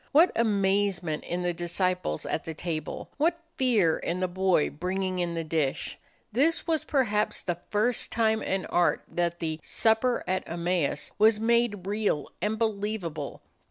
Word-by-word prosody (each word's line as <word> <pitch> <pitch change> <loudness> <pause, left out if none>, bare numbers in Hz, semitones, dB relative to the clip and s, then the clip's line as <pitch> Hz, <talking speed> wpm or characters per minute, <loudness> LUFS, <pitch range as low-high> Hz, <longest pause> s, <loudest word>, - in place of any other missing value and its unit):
What 325 +5 +6
amazement 195 -6 +1
in 180 +1 -2
the 175 0 0
disciples 175 - -1
at - - -2
the 160 - -6
table! 160 -2 -4
What 335 +3 +2 0.2
fear 215 -11 +3
in 175 +2 -2
the 185 - +1
boy 185 -3 +2
bringing 185 +3 -2
in 170 -1 -1
the 165 - -2
dish! 155 -4 -1 0.3
This 300 +9 +2
was 320 -2 +1
perhaps 215 -7 +1
the 175 -2 -2
first 215 +3 +1
time 220 -1 +2
in 190 -1 -1
art 175 0 +2
that 170 -1 -1
the 160 -2 -3
"Supper 230 +2 +2
at 185 0 0
Emmaus" 170 -2 -1
was 215 0 +5
made 225 -4 +2
real 205 -7 -1
and 215 +1 0
believable. 205 -9 -2
190 Hz, 155 wpm, -28 LUFS, 170-220 Hz, 0.3 s, What